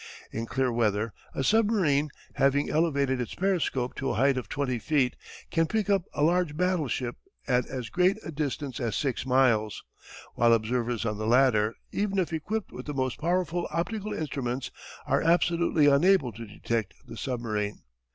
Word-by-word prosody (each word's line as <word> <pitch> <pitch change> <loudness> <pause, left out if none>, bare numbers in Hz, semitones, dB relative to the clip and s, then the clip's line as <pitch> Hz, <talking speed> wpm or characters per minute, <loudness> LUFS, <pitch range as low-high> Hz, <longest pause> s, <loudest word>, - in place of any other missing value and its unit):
In 115 +1 -4
clear 130 0 0
weather 110 -2 0 0.2
a - - -1
submarine, 185 - +3 0.2
having 140 +1 +2
elevated 140 -5 +1
its 120 - -5
periscope 170 -10 0
to 135 - -1
a - - 0
height 135 +3 +3
of 130 - -4
20 130 -4 -1
feet 135 -2 +1 0.4
can 165 -1 +2
pick 210 +2 0
up 195 -3 +2
a 145 - +1
large 170 -2 +2
battleship 155 -9 0 0.3
at 125 -1 +2
as 125 -3 -5
great 185 +3 +3
a 160 - -5
distance 145 -3 -3
as 120 -4 -1
6 135 -3 -1
miles, 115 -6 +2 0.5
while 120 0 +4
observers 115 +1 0
on 105 -1 -2
the 110 - -2
latter, 115 -3 +4 0.2
even 200 -1 -1
if 180 -3 0
equipped 200 +7 -3
with - - -8
the 145 - -4
most 130 -1 -1
powerful 175 0 0
optical 205 +7 -3
instruments, 135 - -3 0.3
are - - +2
absolutely 170 -2 +3
unable 145 -1 +4
to 115 +1 -9
detect 110 0 -3
the 115 -2 -9
submarine. 110 -5 -3
135 Hz, 165 wpm, -28 LUFS, 120-170 Hz, 0.5 s, while